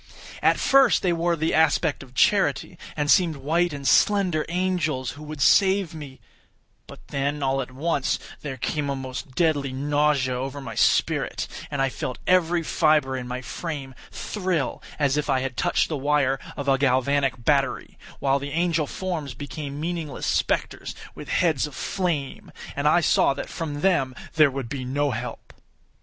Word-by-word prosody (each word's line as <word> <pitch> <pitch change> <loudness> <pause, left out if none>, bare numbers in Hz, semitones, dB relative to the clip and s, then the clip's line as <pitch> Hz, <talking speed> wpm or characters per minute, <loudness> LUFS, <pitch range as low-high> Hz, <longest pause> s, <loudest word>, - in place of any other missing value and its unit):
At - - +3
first 270 -3 +4
they 180 -2 +2
wore 170 +1 +1
the 160 0 -1
aspect 160 0 +2
of 130 -2 -14
charity, 195 +5 +2 0.2
and 145 0 +2
seemed 175 -5 +4
white 165 +5 0
and 140 -2 -4
slender 185 -7 +3
angels 170 -7 -1
who 145 - -12
would 150 -1 -7
save 195 -3 +4
me; 145 -4 -9 0.7
but - - -14
then, 140 +1 -1
all 135 0 +1
at 130 - -6
once, 140 +2 -1 0.2
there 135 -3 -5
came 145 +3 -2
a 140 - -1
most 130 0 -7
deadly 145 -5 +1
nausea 145 -1 +1
over 135 +3 -4
my 135 - -7
spirit, - - +1 0.2
and 140 -2 -1
I 135 - +2
felt 125 -1 -5
every 175 -2 +3
fibre 150 -4 +2
in 125 -1 -5
my 125 +1 -4
frame 145 -4 -5 0.2
thrill 185 - -2 0.2
as 145 -1 +1
if 150 - -1
I 130 -1 +2
had 130 -2 -4
touched - - +1
the 155 - -3
wire 140 -1 +1 0.2
of 140 -1 -4
a 135 -1 +3
galvanic 130 -1 +1
battery, 140 -3 0 0.2
while 140 0 +1
the 140 +1 -5
angel 165 -2 +1
forms 160 -8 -4
became 145 +1 -6
meaningless 160 -4 -4
spectres, - - -1 0.2
with - - -10
heads 160 -5 +2
of 145 - -11
flame, 170 -8 -3 0.2
and - - 0
I - - +5
saw - - +3
that - - -6
from 145 -3 -4
them 145 -9 +2 0.2
there 155 -2 +5
would 135 -2 -5
be 130 +2 -5
no 140 +3 0
help. 120 +1 -6
145 Hz, 170 wpm, -24 LUFS, 135-165 Hz, 0.7 s, I